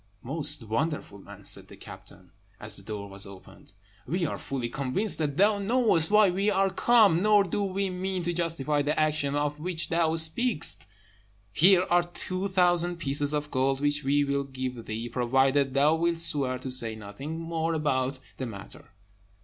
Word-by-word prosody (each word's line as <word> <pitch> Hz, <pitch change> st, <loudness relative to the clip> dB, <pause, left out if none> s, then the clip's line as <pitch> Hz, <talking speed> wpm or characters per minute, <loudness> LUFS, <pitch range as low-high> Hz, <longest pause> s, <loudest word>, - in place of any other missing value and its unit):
"Most 145 Hz, 0 st, +1 dB
wonderful 115 Hz, -1 st, -3 dB
man!" -, -, -13 dB
said -, -, +2 dB
the -, -, -14 dB
captain, 90 Hz, -1 st, -14 dB, 0.3 s
as 105 Hz, -1 st, -4 dB
the -, -, -6 dB
door 100 Hz, 0 st, -7 dB
was 100 Hz, 0 st, -1 dB
opened, 95 Hz, -1 st, -15 dB, 0.3 s
"we 170 Hz, +5 st, -1 dB
are -, -, -4 dB
fully 130 Hz, -3 st, -4 dB
convinced 140 Hz, -, 0 dB
that 145 Hz, -2 st, -2 dB
thou 205 Hz, +1 st, +3 dB
knowest 200 Hz, -6 st, +1 dB
why 210 Hz, -2 st, +5 dB
we 195 Hz, +3 st, 0 dB
are 195 Hz, -1 st, +1 dB
come, 205 Hz, -5 st, +4 dB
nor 210 Hz, 0 st, +4 dB
do 205 Hz, -, -2 dB
we 195 Hz, 0 st, -2 dB
mean 185 Hz, 0 st, -3 dB
to 175 Hz, +1 st, -1 dB
justify 165 Hz, -4 st, -1 dB
the 145 Hz, +2 st, -1 dB
action 150 Hz, -2 st, 0 dB
of 145 Hz, 0 st, -2 dB
which 170 Hz, +1 st, -3 dB
thou 165 Hz, -1 st, +1 dB
speakest. 165 Hz, +5 st, +1 dB, 0.7 s
Here 180 Hz, -, +5 dB
are 175 Hz, 0 st, +3 dB
two 185 Hz, +2 st, -5 dB
thousand 175 Hz, -2 st, +3 dB
pieces 145 Hz, -2 st, -1 dB
of 150 Hz, 0 st, -3 dB
gold, 135 Hz, +1 st, 0 dB
which 145 Hz, +1 st, 0 dB
we 145 Hz, +2 st, +2 dB
will 140 Hz, 0 st, -1 dB
give 130 Hz, -3 st, -6 dB
thee, 110 Hz, +2 st, -4 dB
provided 135 Hz, +3 st, +1 dB
thou 145 Hz, +3 st, +4 dB
wilt 170 Hz, +1 st, 0 dB
swear 140 Hz, -6 st, 0 dB
to 130 Hz, +1 st, -6 dB
say 115 Hz, -3 st, +2 dB
nothing 110 Hz, +10 st, -7 dB
more 165 Hz, 0 st, -2 dB
about 135 Hz, -3 st, -1 dB, 0.2 s
the 130 Hz, -, -4 dB
matter." 100 Hz, -1 st, -11 dB
150 Hz, 175 wpm, -27 LUFS, 130-175 Hz, 0.7 s, why